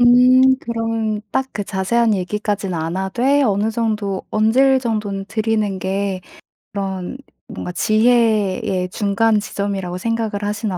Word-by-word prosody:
음 255 +2 +6
그러면 225 -2 -2
딱 265 0 -1
그 205 - -3
자세한 215 +4 +1
얘기까진 200 0 -2
안 165 +2 -3
하되 245 +9 +1
어느 210 -1 +1
정도 215 -4 -2
언질 260 +5 +3
정도는 210 -4 -3
드리는 215 -2 -1
게 190 0 -2 0.5
그런 195 +3 -4 0.3
뭔가 180 - -6
지혜의 215 -1 +2
예 180 -1 -1
중간 210 +2 +1
지점이라고 195 -3 -3
생각을 220 -1 -2
하시나 205 -2 -2
210 Hz, 280 characters per minute, -19 LUFS, 195-230 Hz, 0.5 s, 음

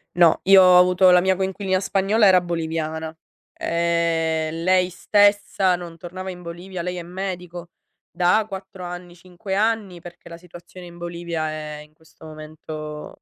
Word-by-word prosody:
No, 170 -2 +4
io 195 0 +7
ho 180 -1 +7
avuto 180 +1 +5
la 180 0 +6
mia 190 0 +2
coinquilina 190 0 -1
spagnola 200 +3 +2
era 185 -1 +6
boliviana. 160 -2 -4 0.4
Ehm, 165 -1 -1
lei 185 0 +3
stessa 205 -1 +2
non 170 -2 -9
tornava 185 +3 -8
in 180 -1 -9
Bolivia. 175 +1 -7
Lei 180 0 -4
è - - -5
medico 180 -1 -7 0.4
da 180 +5 +2
4 190 -2 -9
anni, 175 0 -8
5 185 +3 -7
anni, 205 -4 -1
perché 175 0 -13
la 170 - -9
situazione 175 +1 -13
in 175 0 -13
Bolivia 170 -2 -4
è 150 -1 -7
in 150 - -22
questo 160 0 -19
momento, 155 -1 -9
175 Hz, 155 wpm, -22 LUFS, 165-185 Hz, 0.4 s, io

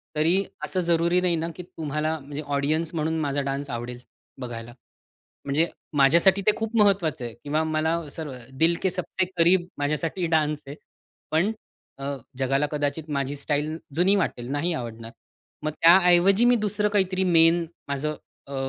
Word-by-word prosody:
तरी 170 +6 +3 0.2
असं 185 - -1
जरुरी 170 +1 +2
नाही 175 -2 +2
ना, 165 +1 -2
की 180 - -7
तुम्हाला 155 -1 -3
म्हणजे 145 +1 -7
ऑडियन्स 155 +4 0
म्हणून 160 +1 -1
माझा 145 -2 -1
डान्स 140 +1 -3
आवडेल, 120 0 -5 0.4
बघायला. 120 -1 -6 0.7
म्हणजे 145 +4 +1 0.3
माझ्यासाठी 170 +8 +5
ते - - +7
खूप 225 +1 -3
महत्वाचं 180 - +2
आहे; 120 -1 -6
किंवा 150 +2 0
मला 160 +1 0
असं 150 +1 -7 0.3
"दिल 165 +1 +4
के 190 - +2
सबसे 185 +1 -1
करीब" 175 +1 +4
माझ्यासाठी 155 +5 -1
डान्स 150 -1 +1
आहे. 140 +2 -8 0.5
पण 175 +8 +2 0.5
अ, 135 - -6 0.3
जगाला 135 +2 +1
कदाचित 150 +1 -2
माझी 140 0 -1
स्टाईल 150 +2 -2 0.2
जुनी 180 +5 +4
वाटेल, 125 -10 -2
नाही 145 +5 0
आवडणार. 115 -4 -6 0.5
मग 155 - -1
त्या 170 +3 +9
ऐवजी 195 +6 +5
मी 245 0 +5
दुसरं 210 -1 +1
काहीतरी 190 -2 +1
मेन 170 -1 +4 0.2
माझं 145 +2 -2 0.3
अ, 140 - -8
160 Hz, 155 wpm, -25 LUFS, 145-175 Hz, 0.7 s, त्या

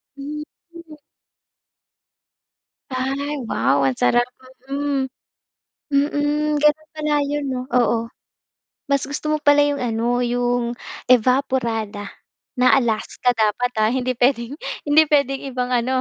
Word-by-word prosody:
Hmm, 295 +2 -6 0.3
mm. 330 -3 -12 1.9
Ay, 275 +3 -2
wow 140 -8 +1
ang 130 -2 +1
sarap, 240 - +4 0.5
mm. 275 -2 -1 0.8
Mm, 290 +1 +1
gano'n 300 +1 +2
pala 300 -1 0
'yon, 290 0 -2
'no, 250 -1 -3
oo. 230 -2 +2 0.8
Mas 280 -1 +1
gusto 300 +2 -3
mo 305 - +2
pala 290 -1 +4
'yong 290 0 0
ano, 240 0 0
'yong 245 0 0 0.4
Evaporada 235 -4 +1 0.5
na 255 - +5
Alaska 245 0 0
dapat 225 +3 +1
ha, 215 - +4
hindi 255 0 0
puwedeng, 245 +1 +1 0.3
hindi 295 +2 +6
puwedeng 280 -2 +2
ibang 250 -1 -3
ano, 250 +1 +1
260 Hz, 115 wpm, -21 LUFS, 240-290 Hz, 1.9 s, hindi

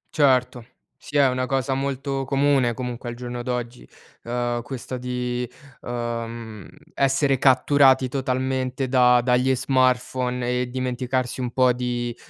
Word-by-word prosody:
Certo. 130 -4 +2 0.3
Sì 145 - -5
è 140 -1 +6
una 130 0 -1
cosa 135 0 0
molto 135 0 -2
comune 135 -3 +2
comunque 125 0 -5
al 120 - -6
giorno 120 0 -6
d'oggi, 125 0 -4 0.4
ehm, 120 0 -2
questa 130 +1 -6
di, 125 -1 -3 0.3
ehm, 115 -3 -5 0.2
essere 135 0 +2
catturati 130 0 +4
totalmente 130 0 -2
da 125 -1 +5
dagli 125 +1 +2
smartphone 125 -1 0
e 125 - -3
dimenticarsi 130 0 -2
un 125 - -2
po' 125 0 +3
di 120 -1 -3
125 Hz, 125 wpm, -23 LUFS, 120-130 Hz, 0.4 s, è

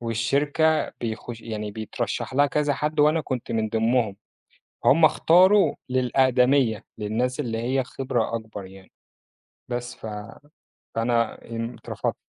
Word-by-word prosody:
والشركة 140 +7 +1
بيخش 115 0 -5
يعني 105 -2 -5
بيترشّح 110 +4 -4
لها 145 +2 +5
كذا 145 0 0
حد 150 +1 -1
وأنا 155 +2 +4
كنت 130 -6 -4
من 110 -1 0
ضمنهم 115 -1 +1 0.7
همُ 160 +3 +6
اختاروا 185 +6 +5
للأقدمية، 125 -2 +2
للناس 120 +6 -1
اللي 115 -6 -2
هي 130 +3 0
خِبرة 125 -3 -2
أكبر 110 -3 -7
يعني 95 0 -15 0.8
بس 120 0 -4
ف - - -9 0.9
فأنا 115 0 0
إمم، 115 +1 -3
اترفضت. - - -4
120 Hz, 120 wpm, -24 LUFS, 115-140 Hz, 0.9 s, همُ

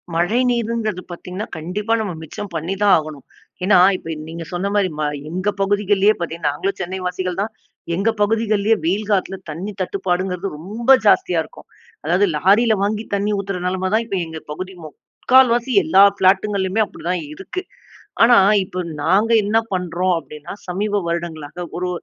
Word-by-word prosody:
மழை 175 +8 +2
நீருங்கிறது 230 -5 -1
பார்த்தீங்கன்னா, 180 +5 -6
கண்டிப்பா 190 +8 -2
நம்ம 205 -4 -3
மிச்சம் 190 +5 -7
பண்ணிதான் 195 +5 +2
ஆகணும். 155 -3 -6 0.4
ஏன்னா, 195 +1 +5 0.2
இப்ப 165 -2 -6
நீங்க 165 +1 -6
சொன்னமாரி 200 +2 0
ம 155 - 0 0.2
எங்க 185 +5 -1
பகுதிகள்லேயே 205 +1 +3
பார்த்தீங்கன்னா, 165 -3 -2
நாங்களும் 190 +7 -3
சென்னை 185 +1 -4
வாசிகள்தான். 185 +3 -2 0.4
எங்க 195 +5 +1
பகுதிகள்லேயே 215 0 +2
வெயில் 200 +5 0
காலத்தில 195 -1 0
தண்ணீ 175 +7 -5
தட்டுப்பாடுங்கிறது 185 0 -2
ரொம்ப 215 - -6 0.2
ஜாஸ்தியா 180 -4 +3
இருக்கும். - - -15 0.4
அதாவது 180 +5 +3
லாரில 215 +8 +4
வாங்கி 210 +2 -1
தண்ணீ 200 +1 0
ஊத்துற 195 -2 -4
நிலைமை 185 +1 -1
தான் 225 +1 +3
இப்ப 200 -4 -3
எங்க 160 -1 -7
பகுதி 185 +5 -6
முக்கால்வாசி 245 - +2
எல்லா 190 +5 +6
ஃபிளாட்டுங்கள்லயுமே 195 +1 +2
அப்பிடிதான் 180 -2 -4
இருக்கு. 275 - -6 0.6
ஆனா, 240 +1 +7 0.3
இப்ப 185 0 -6 0.2
நாங்க 200 +8 +3
என்ன 210 +2 +1 0.2
பண்றோம் 180 0 0
அப்பிடின்னா, 150 -2 -9
சமீப 205 +3 -1
வருடங்களாக 170 -1 -4
ஒரு 180 +1 -2
190 Hz, 140 wpm, -20 LUFS, 175-210 Hz, 0.6 s, ஆனா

